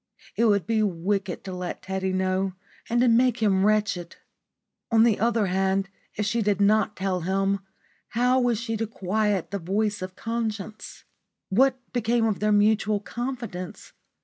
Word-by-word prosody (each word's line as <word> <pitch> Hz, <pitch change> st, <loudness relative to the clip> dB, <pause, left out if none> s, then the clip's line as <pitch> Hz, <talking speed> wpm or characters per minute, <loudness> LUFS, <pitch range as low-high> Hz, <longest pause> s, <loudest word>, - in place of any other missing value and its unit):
It 235 Hz, -, +2 dB
would 200 Hz, -4 st, +3 dB
be 225 Hz, -1 st, +1 dB
wicked 195 Hz, 0 st, -1 dB
to 190 Hz, -2 st, -6 dB
let 180 Hz, -1 st, -5 dB
Teddy 190 Hz, 0 st, -2 dB
know 185 Hz, 0 st, 0 dB, 0.4 s
and 240 Hz, +1 st, +2 dB
to 250 Hz, -, +4 dB
make 240 Hz, +1 st, +4 dB
him 200 Hz, -4 st, +2 dB
wretched. 205 Hz, -5 st, 0 dB, 0.7 s
On 225 Hz, -1 st, +5 dB
the 230 Hz, -3 st, +3 dB
other 230 Hz, 0 st, +2 dB
hand, 190 Hz, +1 st, 0 dB, 0.3 s
if 210 Hz, -, -1 dB
she 230 Hz, +2 st, 0 dB
did 205 Hz, -2 st, +1 dB
not 210 Hz, +1 st, +3 dB
tell 185 Hz, -1 st, -1 dB
him, 195 Hz, +3 st, 0 dB, 0.5 s
how 250 Hz, +2 st, +2 dB
was 240 Hz, -3 st, +1 dB
she 230 Hz, -1 st, -3 dB
to 225 Hz, +1 st, -2 dB
quiet 205 Hz, -2 st, -1 dB
the 200 Hz, -, -2 dB
voice 205 Hz, +4 st, -1 dB
of 185 Hz, 0 st, -6 dB
conscience? 220 Hz, -2 st, -4 dB, 0.5 s
What 260 Hz, +6 st, +3 dB, 0.2 s
became 235 Hz, -1 st, +1 dB
of 215 Hz, -3 st, 0 dB
their 210 Hz, 0 st, +1 dB
mutual 210 Hz, 0 st, +3 dB
confidence? 235 Hz, -6 st, -6 dB
210 Hz, 160 wpm, -25 LUFS, 190-225 Hz, 0.7 s, On